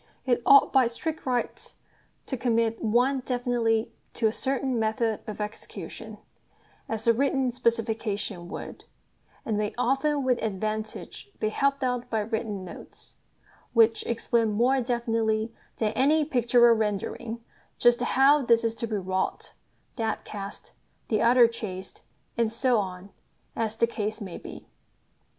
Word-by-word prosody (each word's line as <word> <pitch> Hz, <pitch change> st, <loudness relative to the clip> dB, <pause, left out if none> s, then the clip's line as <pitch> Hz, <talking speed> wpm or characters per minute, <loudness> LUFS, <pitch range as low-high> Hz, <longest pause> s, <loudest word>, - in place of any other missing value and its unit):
It 245 Hz, -2 st, +2 dB
ought 275 Hz, 0 st, +7 dB
by 265 Hz, -3 st, +5 dB
strict 305 Hz, +6 st, -5 dB
rights 250 Hz, -2 st, -2 dB, 0.5 s
to 265 Hz, -, -3 dB
commit 230 Hz, -2 st, 0 dB
one 245 Hz, +5 st, +2 dB
definitely 245 Hz, -3 st, 0 dB, 0.2 s
to 230 Hz, -, 0 dB
a 220 Hz, -, +3 dB
certain 265 Hz, -2 st, -1 dB
method 220 Hz, 0 st, 0 dB
of 215 Hz, -1 st, -6 dB
execution, 210 Hz, +1 st, -7 dB, 0.7 s
as 225 Hz, 0 st, -3 dB
a 230 Hz, -, +6 dB
written 265 Hz, +1 st, +1 dB
specification 220 Hz, -6 st, -2 dB
would; -, -, -8 dB, 0.6 s
and 215 Hz, -2 st, -1 dB
may 210 Hz, -1 st, -2 dB
often 275 Hz, +3 st, +1 dB
with 250 Hz, -2 st, +1 dB
advantage 215 Hz, -, -4 dB
be 215 Hz, -, 0 dB
helped 275 Hz, +4 st, 0 dB
out 250 Hz, -1 st, -1 dB
by 220 Hz, -1 st, 0 dB
written 210 Hz, -3 st, -3 dB
notes, 175 Hz, -, -11 dB, 0.6 s
which 225 Hz, -1 st, +4 dB
explain 230 Hz, -1 st, +1 dB
more 255 Hz, +5 st, +3 dB
definitely 230 Hz, -2 st, 0 dB, 0.2 s
than 215 Hz, -2 st, 0 dB
any 300 Hz, +4 st, +3 dB
pictorial 240 Hz, -3 st, +4 dB
rendering 220 Hz, +2 st, -3 dB, 0.3 s
just 240 Hz, 0 st, +4 dB
how 270 Hz, +3 st, +4 dB
this 235 Hz, -1 st, +4 dB
is 230 Hz, 0 st, 0 dB
to 230 Hz, -, -3 dB
be 215 Hz, -, -2 dB
wrought, 190 Hz, -1 st, -2 dB, 0.4 s
that 225 Hz, -2 st, -2 dB
cast, 200 Hz, -1 st, -8 dB, 0.4 s
the 215 Hz, -, +1 dB
other 240 Hz, 0 st, +6 dB
chased, 195 Hz, -5 st, -7 dB, 0.4 s
and 225 Hz, -2 st, +2 dB
so 240 Hz, 0 st, +2 dB
on, 190 Hz, 0 st, -5 dB, 0.4 s
as 225 Hz, -1 st, -2 dB
the 230 Hz, -, +4 dB
case 215 Hz, -2 st, -3 dB
may 190 Hz, -5 st, -7 dB
be. -, -, -10 dB
230 Hz, 140 wpm, -27 LUFS, 215-250 Hz, 0.7 s, ought